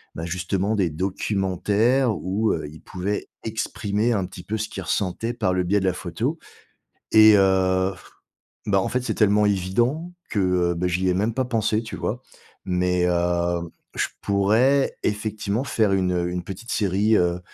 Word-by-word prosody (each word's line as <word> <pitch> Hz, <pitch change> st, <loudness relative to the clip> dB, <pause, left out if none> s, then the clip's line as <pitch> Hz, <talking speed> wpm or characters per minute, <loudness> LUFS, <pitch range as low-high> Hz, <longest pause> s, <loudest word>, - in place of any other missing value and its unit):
bah, 80 Hz, -, -4 dB
justement 90 Hz, +4 st, -1 dB
des 95 Hz, -5 st, +1 dB
documentaires 100 Hz, -, 0 dB
où, 100 Hz, +5 st, 0 dB
heu, 80 Hz, -2 st, -4 dB
ils 80 Hz, -, -13 dB
pouvaient 95 Hz, +3 st, -4 dB
exprimer 110 Hz, 0 st, -1 dB
un 100 Hz, -4 st, 0 dB
petit 90 Hz, -1 st, -10 dB
peu 110 Hz, -, -3 dB
ce 110 Hz, 0 st, -2 dB
qu'ils -, -, -7 dB
ressentaient 105 Hz, +4 st, -1 dB
par 110 Hz, -6 st, 0 dB
le 90 Hz, -, +1 dB
biais 100 Hz, +3 st, +2 dB
de 95 Hz, -, -2 dB
la 95 Hz, -, +2 dB
photo 110 Hz, -, -3 dB, 0.7 s
et 110 Hz, -1 st, +8 dB
heu, 95 Hz, -1 st, +3 dB, 0.7 s
bah, 95 Hz, -2 st, +3 dB
en -, -, -1 dB
fait, 125 Hz, +1 st, -1 dB
c'est -, -, -2 dB
tellement 105 Hz, -1 st, +3 dB
évident 120 Hz, -, 0 dB, 0.2 s
que, 105 Hz, -, 0 dB
heu, 90 Hz, -2 st, +2 dB
bah, 90 Hz, +2 st, -1 dB
j'y 90 Hz, +1 st, 0 dB
ai 90 Hz, -, +2 dB
même 105 Hz, +5 st, 0 dB
pas 130 Hz, -, 0 dB
pensé, 110 Hz, -2 st, 0 dB
tu 115 Hz, -, -7 dB
vois? 120 Hz, +4 st, -3 dB, 0.4 s
Mais, 90 Hz, -1 st, +1 dB
heu, 85 Hz, 0 st, +1 dB, 0.4 s
je -, -, 0 dB
pourrais, 110 Hz, +8 st, +2 dB
effectivement, 105 Hz, +2 st, -1 dB
faire 110 Hz, -7 st, +1 dB
une, 95 Hz, -1 st, +1 dB
heu, 90 Hz, 0 st, -1 dB
une 90 Hz, 0 st, -3 dB
petite 100 Hz, +6 st, -7 dB
série, 105 Hz, +2 st, +2 dB
heu, 90 Hz, 0 st, +1 dB
100 Hz, 175 wpm, -23 LUFS, 90-110 Hz, 0.7 s, et